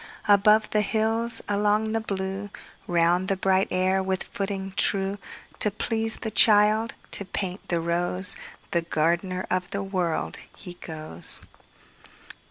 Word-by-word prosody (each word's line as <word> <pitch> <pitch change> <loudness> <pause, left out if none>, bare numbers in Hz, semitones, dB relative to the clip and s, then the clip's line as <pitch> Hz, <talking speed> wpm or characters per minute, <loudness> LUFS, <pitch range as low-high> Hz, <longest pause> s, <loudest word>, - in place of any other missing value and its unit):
Above 210 +1 +5
the 210 - +2
hills, 225 +2 +1
along 210 +1 +1
the 225 0 -1
blue, 195 -1 -4 0.4
Round 175 +2 +2
the 195 - 0
bright 190 +1 +2
air 185 +1 +1
with 190 0 -2
footing 195 -1 -4
true, 195 0 +2 0.4
To 210 - +6
please 225 +2 -1
the 220 - -6
child, 215 +2 +4 0.2
to - - -2
paint 190 0 -5
the 170 - 0
rose, 175 +2 +3 0.4
The 170 - +2
gardener 170 +3 -1
of 185 0 -1
the 200 +1 -3
World, 175 - -2 0.2
he 180 -3 -8
goes. 155 - -4
195 Hz, 135 wpm, -25 LUFS, 180-210 Hz, 0.4 s, To